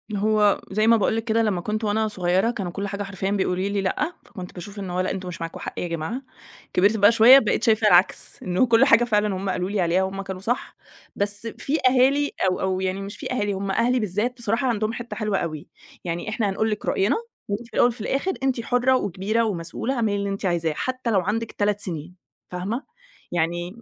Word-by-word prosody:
هو 210 Hz, 0 st, +2 dB
زي 215 Hz, +3 st, +2 dB
ما 230 Hz, -, +6 dB
باقول 220 Hz, +1 st, +1 dB
لِك 225 Hz, -, -1 dB
كده 230 Hz, 0 st, +1 dB
لمّا 200 Hz, -5 st, 0 dB
كنت 215 Hz, +4 st, -3 dB
وأنا 215 Hz, +1 st, +1 dB
صغيّرة 190 Hz, +2 st, +1 dB
كانوا 195 Hz, -7 st, -4 dB
كل 200 Hz, +3 st, -4 dB
حاجة 200 Hz, +1 st, -4 dB
حرفيًا 195 Hz, 0 st, -3 dB
بيقولوا 185 Hz, -2 st, 0 dB
لي 200 Hz, -1 st, -1 dB
لأ، 255 Hz, -, -1 dB
فكنت 185 Hz, -4 st, -9 dB
باشوف 200 Hz, +3 st, -9 dB
إنه 185 Hz, -1 st, -2 dB
لأ، 185 Hz, -, -1 dB
أنتم 185 Hz, -1 st, -5 dB
مش 180 Hz, -, -7 dB
معاكم 165 Hz, 0 st, -5 dB
حق -, -, -6 dB
يا 175 Hz, -, -2 dB
جماعة. 170 Hz, +10 st, -4 dB, 0.5 s
كبرت 200 Hz, +4 st, +3 dB
بقى 205 Hz, +1 st, +6 dB
شوية 235 Hz, +4 st, +8 dB
بقيت 220 Hz, -2 st, 0 dB
شايفة 220 Hz, -2 st, +3 dB
العكس 180 Hz, 0 st, +2 dB
إنه 185 Hz, +7 st, +2 dB
كل 230 Hz, 0 st, +5 dB
حاجة 240 Hz, -, +6 dB
فعلًا 210 Hz, -3 st, +1 dB
هم 195 Hz, +1 st, -3 dB
قالوا 185 Hz, 0 st, -1 dB
لي 200 Hz, -2 st, 0 dB
عليها 175 Hz, +2 st, +2 dB
هم 195 Hz, +1 st, -3 dB
كانوا 190 Hz, -1 st, -6 dB
صح، 235 Hz, +5 st, -2 dB, 0.4 s
بس 205 Hz, +2 st, -1 dB
في 275 Hz, +6 st, -2 dB
أهالي 270 Hz, +3 st, +3 dB, 0.2 s
أو 185 Hz, -, -2 dB
أو 190 Hz, -1 st, 0 dB
يعني 190 Hz, +1 st, -2 dB
مش 200 Hz, +1 st, -7 dB
في -, -, -6 dB
أهالي، 205 Hz, -5 st, 0 dB
هم 195 Hz, 0 st, -3 dB
أهلي 245 Hz, +5 st, +2 dB
بالذات 215 Hz, +4 st, -1 dB
بصراحة 240 Hz, +2 st, 0 dB
عندهم 220 Hz, -1 st, 0 dB
حتّة 240 Hz, 0 st, -6 dB
حلوة 210 Hz, -3 st, -1 dB
أوي، 155 Hz, -4 st, -4 dB, 0.4 s
"يعني 175 Hz, +5 st, -3 dB
إحنا 220 Hz, -1 st, 0 dB
هنقول 220 Hz, +3 st, 0 dB
لِك 210 Hz, -, -4 dB
رأينا 195 Hz, +3 st, +2 dB, 0.3 s
وأنتِ 210 Hz, +4 st, -3 dB
في -, -, -27 dB
الأول 245 Hz, -, +4 dB
في 230 Hz, -1 st, -10 dB
الآخِر 275 Hz, -, -1 dB
أنتِ 260 Hz, -3 st, +1 dB
حرّة 245 Hz, +2 st, +2 dB
وكبيرة 205 Hz, +4 st, -1 dB
ومسؤولة، 195 Hz, +4 st, -2 dB
اعملي 220 Hz, -4 st, 0 dB
اللي 200 Hz, 0 st, -2 dB
أنتِ 195 Hz, 0 st, -4 dB
عايزاه، 170 Hz, -3 st, 0 dB
حتّى 255 Hz, +5 st, -3 dB
لو 195 Hz, -, +4 dB
عندِك 215 Hz, +4 st, -2 dB
3 205 Hz, 0 st, 0 dB
سِنين." 175 Hz, -2 st, -5 dB, 0.4 s
فاهمة؟ 195 Hz, +9 st, -3 dB, 0.5 s
يعني 175 Hz, +5 st, -2 dB
205 Hz, 215 wpm, -24 LUFS, 185-230 Hz, 0.5 s, شوية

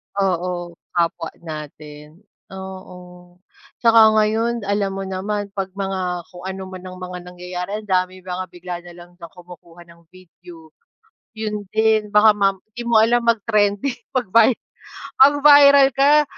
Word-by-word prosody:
Oo, 180 Hz, -3 st, -2 dB, 0.2 s
kapwa 170 Hz, -1 st, -1 dB, 0.2 s
natin. 150 Hz, +2 st, -10 dB, 0.2 s
Oo, 180 Hz, -2 st, -11 dB, 0.5 s
tsaka 225 Hz, -1 st, +6 dB
ngayon 225 Hz, +2 st, +1 dB
alam 200 Hz, -1 st, -1 dB
mo 195 Hz, -, -4 dB
naman 200 Hz, +2 st, -4 dB
'pag 195 Hz, -1 st, -5 dB
mga 185 Hz, -3 st, -3 dB
kung 180 Hz, 0 st, -12 dB
ano 190 Hz, 0 st, -6 dB
man 185 Hz, 0 st, -10 dB
ang 185 Hz, 0 st, -10 dB
mga 180 Hz, 0 st, -7 dB
nangyayari, 180 Hz, +1 st, -7 dB
andaming 185 Hz, -1 st, -1 dB
mga 185 Hz, 0 st, -5 dB
bigla 180 Hz, 0 st, -7 dB
na 175 Hz, 0 st, -14 dB
lang 175 Hz, 0 st, -14 dB
na 170 Hz, -, -9 dB
kumukuha 175 Hz, 0 st, -15 dB
ng 170 Hz, -1 st, -21 dB
video. 175 Hz, -2 st, -16 dB, 0.6 s
Yun 210 Hz, -1 st, -4 dB
din, 220 Hz, -1 st, +2 dB
baka 210 Hz, +1 st, +6 dB
mam 195 Hz, -2 st, 0 dB
'di 240 Hz, +2 st, -7 dB
mo 225 Hz, -2 st, +4 dB
alam 235 Hz, +1 st, +1 dB
mag 230 Hz, -2 st, +2 dB
trending, 210 Hz, +3 st, 0 dB, 0.2 s
mag-vi 230 Hz, 0 st, +3 dB, 0.6 s
mag-viral 280 Hz, 0 st, +7 dB
ka. 290 Hz, +3 st, +4 dB
190 Hz, 140 wpm, -20 LUFS, 180-220 Hz, 0.6 s, mag-viral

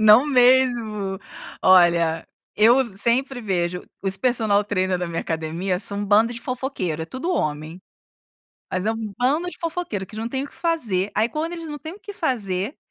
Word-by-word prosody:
Não 215 Hz, +5 st, +7 dB
mesmo! 245 Hz, -7 st, +3 dB, 0.4 s
Olha, 170 Hz, -3 st, +4 dB, 0.3 s
eu 240 Hz, +5 st, +5 dB
sempre 250 Hz, +4 st, +1 dB
vejo 180 Hz, -4 st, -1 dB, 0.2 s
os 195 Hz, -1 st, 0 dB
personal 220 Hz, -4 st, +2 dB
trainer 185 Hz, -2 st, 0 dB
da 180 Hz, -, -2 dB
minha 165 Hz, -1 st, -3 dB
academia 165 Hz, +3 st, -2 dB
são 200 Hz, 0 st, -3 dB
um 205 Hz, -, -2 dB
bando 215 Hz, +3 st, +4 dB
de 235 Hz, -, -7 dB
fofoqueiro. 235 Hz, -, -3 dB
É -, -, -3 dB
tudo 260 Hz, -, -4 dB
homem. 155 Hz, -, -2 dB, 0.9 s
Mas 185 Hz, +2 st, -2 dB
é 220 Hz, -, +2 dB
um 220 Hz, -2 st, -5 dB
bando 290 Hz, +8 st, +1 dB
de -, -, -10 dB
fofoqueiro 330 Hz, -, -3 dB
que -, -, -14 dB
já 215 Hz, -, -4 dB
não 230 Hz, -, -3 dB
tem 265 Hz, +2 st, -2 dB
o -, -, -8 dB
que -, -, -19 dB
fazer. 225 Hz, -, -1 dB
Aí, 220 Hz, +2 st, +3 dB
quando 315 Hz, +6 st, -3 dB
eles 335 Hz, -1 st, -6 dB
não 295 Hz, -1 st, -6 dB
têm 315 Hz, +4 st, -8 dB
o -, -, -14 dB
que 410 Hz, -, -8 dB
fazer, 220 Hz, -, -2 dB
215 Hz, 190 wpm, -23 LUFS, 185-260 Hz, 0.9 s, Não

